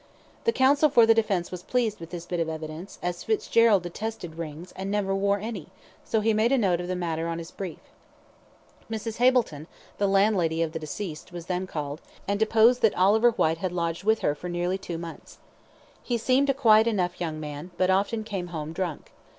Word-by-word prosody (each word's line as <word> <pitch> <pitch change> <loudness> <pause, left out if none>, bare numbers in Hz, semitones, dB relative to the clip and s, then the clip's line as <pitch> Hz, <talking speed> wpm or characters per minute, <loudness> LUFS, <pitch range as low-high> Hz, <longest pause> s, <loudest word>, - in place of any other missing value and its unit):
The 460 - +4
counsel 285 -1 +4
for 235 -4 +6
the 225 - +6
defence 200 -6 0
was 180 -1 -6
pleased 230 -1 -1
with 165 -1 -9
this 175 -1 -7
bit 175 -1 -3
of 165 -1 0
evidence, 160 +3 -7
as 175 0 -3
Fitzgerald 220 -2 +3
detested 175 -1 -5
rings, 165 +2 -7
and 190 +1 -4
never 200 -1 0
wore 200 +1 +2
any; 205 -5 -6 0.4
so 220 - 0
he 220 +1 +2
made 220 +3 +2
a 275 - +4
note 185 -7 +2
of 175 - -5
the 185 - -2
matter 165 -2 -2
on 165 0 -2
his 165 0 -7
brief. 185 -5 -6 1.1
Mrs. 220 0 -4
Hableton, 240 - +2 0.3
the 200 - +2
landlady 195 -5 +2
of 160 - -3
the 160 - -4
deceased, 155 +2 -6
was 175 -2 -7
then 185 +1 -2
called, 150 -3 -5 0.3
and 200 +1 0
deposed 225 +3 +4
that 220 - +3
Oliver 210 +6 +5
Whyte 165 -8 +1
had 185 -1 -2
lodged 170 0 -2
with 220 +2 +2
her 145 - +2
for 175 +4 -7
nearly 175 +2 -1
two 175 -3 -5
months. 165 0 -9 0.6
He 240 - -1
seemed 260 +4 +2
a - - +4
quiet 225 -4 +5
enough 180 -6 -1
young 160 -3 -3
man, 150 +2 -6
but 185 0 +3
often 205 +4 +1
came 195 -5 -4
home 160 -2 -5
drunk. 175 -4 -4
185 Hz, 205 wpm, -26 LUFS, 170-220 Hz, 1.1 s, for